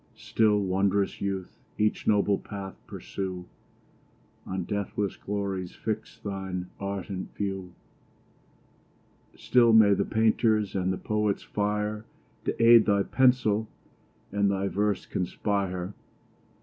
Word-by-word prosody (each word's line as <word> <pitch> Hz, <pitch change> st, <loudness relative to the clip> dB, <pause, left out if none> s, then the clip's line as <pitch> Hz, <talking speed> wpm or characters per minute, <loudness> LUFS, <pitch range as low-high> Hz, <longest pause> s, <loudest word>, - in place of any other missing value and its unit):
Still, 105 Hz, -2 st, +2 dB
wond'rous 100 Hz, +1 st, 0 dB
youth! 95 Hz, -2 st, -4 dB, 0.2 s
each 105 Hz, 0 st, 0 dB
noble 100 Hz, -1 st, +3 dB
path 100 Hz, -2 st, -7 dB
pursue, 95 Hz, -2 st, -5 dB, 1.0 s
On 95 Hz, -1 st, -2 dB
deathless 100 Hz, 0 st, -2 dB
glories 100 Hz, -3 st, -4 dB
fix 110 Hz, -1 st, -4 dB
thine 95 Hz, -2 st, -5 dB
ardent 100 Hz, -1 st, -5 dB
view: 95 Hz, -3 st, -4 dB, 1.6 s
Still 120 Hz, -2 st, +4 dB
may 110 Hz, -2 st, +7 dB
the 100 Hz, -, +1 dB
painter's 110 Hz, -1 st, +2 dB
and 95 Hz, -1 st, 0 dB
the 95 Hz, -, -2 dB
poet's 105 Hz, -2 st, -1 dB
fire 105 Hz, +1 st, -2 dB, 0.4 s
To -, -, -2 dB
aid 115 Hz, -1 st, +8 dB
thy 100 Hz, -1 st, +3 dB
pencil, 120 Hz, -4 st, +2 dB, 0.6 s
and 100 Hz, 0 st, +2 dB
thy 100 Hz, 0 st, 0 dB
verse 105 Hz, 0 st, 0 dB
conspire! 95 Hz, 0 st, -2 dB
100 Hz, 110 wpm, -27 LUFS, 95-105 Hz, 1.6 s, aid